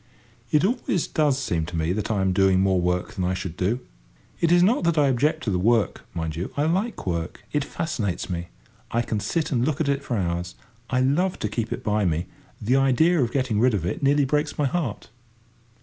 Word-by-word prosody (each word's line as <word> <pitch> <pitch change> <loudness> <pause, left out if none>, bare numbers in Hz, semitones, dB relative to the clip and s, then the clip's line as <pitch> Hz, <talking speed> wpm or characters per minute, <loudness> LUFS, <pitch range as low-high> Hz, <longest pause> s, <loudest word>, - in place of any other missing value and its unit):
It 150 +3 +3
always 200 - 0
does 150 -4 +1
seem 85 - -1
to 90 - -6
me 80 +2 0
that 105 +2 -3
I 105 -3 +1
am 95 -1 +2
doing 95 0 +4
more 95 -1 +2
work 90 0 -1
than 95 - -3
I 90 +1 0
should 90 -2 -5
do. 105 +8 0 0.6
It 170 - +2
is 175 0 +6
not 235 +9 +3
that 170 -1 +2
I 145 -2 +5
object 150 +5 +1
to 105 - -1
the 90 - 0
work, 110 0 +1
mind 80 -2 -3
you; 85 +4 -4
I 145 - +2
like 190 +9 -1
work: 85 +1 -3
it 150 - +1
fascinates 110 - -3
me. 85 -2 -4 0.4
I 120 +1 0
can 110 -2 -2
sit 150 +10 -1
and 120 -4 +1
look 145 +2 0
at 160 - 0
it 140 0 0
for 120 -4 -2
hours. 90 -1 -2 0.3
I 130 0 +1
love 165 +8 +1
to - - -2
keep 110 +1 -3
it - - -4
by 105 -1 +1
me: 85 0 0 0.3
the 125 +6 +2
idea 140 +5 +3
of 120 -2 0
getting 130 -6 0
rid 125 -1 +4
of 90 -5 -2
it 90 - -3
nearly 140 0 +3
breaks 150 +2 -1
my 145 - +1
heart. 135 -9 -3
120 Hz, 225 wpm, -24 LUFS, 95-150 Hz, 0.6 s, is